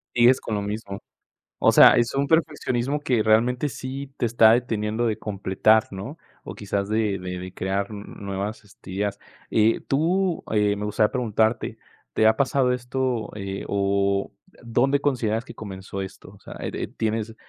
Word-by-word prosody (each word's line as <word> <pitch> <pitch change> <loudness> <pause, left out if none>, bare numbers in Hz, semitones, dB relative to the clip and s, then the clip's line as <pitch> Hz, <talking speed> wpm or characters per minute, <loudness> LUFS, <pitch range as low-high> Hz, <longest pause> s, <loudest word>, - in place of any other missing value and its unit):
Sigues 120 +2 +5
con 110 - -3
lo 105 - -1
mismo. 100 -1 -5 0.6
O - - +5
sea, - - +8
es 120 +2 +1
un 140 - +1
perfeccionismo 145 -4 0
que, 125 -6 +1
realmente, 120 +6 +2
sí 135 +1 -6
te - - 0
está 115 -1 +5
deteniendo 110 -1 0
de 110 -2 0
completar, 105 +2 +2
¿no?, 100 +11 -7 0.3
o - - -8
quizás 100 -1 -3
de 110 -3 0
de 90 0 -5
de 90 0 -8
crear 95 +1 -2
n 105 -1 -7
nuevas, 100 +2 -4
este, 100 -2 -14
ideas, 100 +2 -2 0.3
eh, 110 +1 +3
tú, 175 +5 +1
eh, 105 -1 +2
me 105 +1 -4
gustaría 105 0 +1
preguntarte, 110 -2 0 0.4
¿te 110 - +2
ha 110 - +5
pasado 130 0 +2
esto? 125 -2 -2
Eh, 100 -1 -5
o 100 0 0 0.3
dónde 125 +4 +2
consideras 120 -5 0
que - - -10
comenzó 95 -2 -7
esto, 95 0 -9
o 100 - -18
sea, - - -11
eh - - -3
eh, - - -3
tienes 110 0 -3
110 Hz, 170 wpm, -24 LUFS, 100-125 Hz, 0.6 s, sea